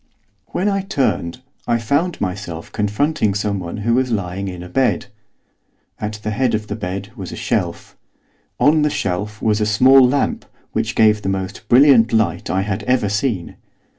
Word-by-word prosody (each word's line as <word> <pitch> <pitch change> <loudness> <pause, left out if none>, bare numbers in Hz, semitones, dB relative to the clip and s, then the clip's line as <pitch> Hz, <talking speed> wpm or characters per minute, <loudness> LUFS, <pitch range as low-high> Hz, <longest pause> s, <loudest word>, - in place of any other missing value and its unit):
When 190 - -2
I 195 -1 +1
turned 130 - -1 0.3
I 120 -1 +2
found 145 +10 0
myself 90 -4 -5
confronting 105 +1 0
someone 100 -3 -2
who 115 - +3
was 130 +1 +2
lying 100 -3 -2
in 90 -1 -7
bed. 125 -9 +1 0.9
At 105 0 -3
the 110 - -2
head 120 +2 +1
of 110 0 -3
the - - -5
bed 100 0 -5
was 95 -6 -7
a - - -6
shelf. - - -2 0.6
On 155 +1 +4
the 150 - +3
shelf 105 -1 -3
was 110 -1 +2
a - - +2
small 130 +5 +6
lamp 130 +3 +1 0.3
which 115 +1 -2
gave 110 -1 +4
the 95 - -2
most 95 -1 -4
brilliant 125 -3 +6
light 100 -6 0
I 95 - +1
had 100 +1 -3
ever 125 -4 +1
seen. 105 -4 -2
110 Hz, 165 wpm, -19 LUFS, 100-130 Hz, 0.9 s, small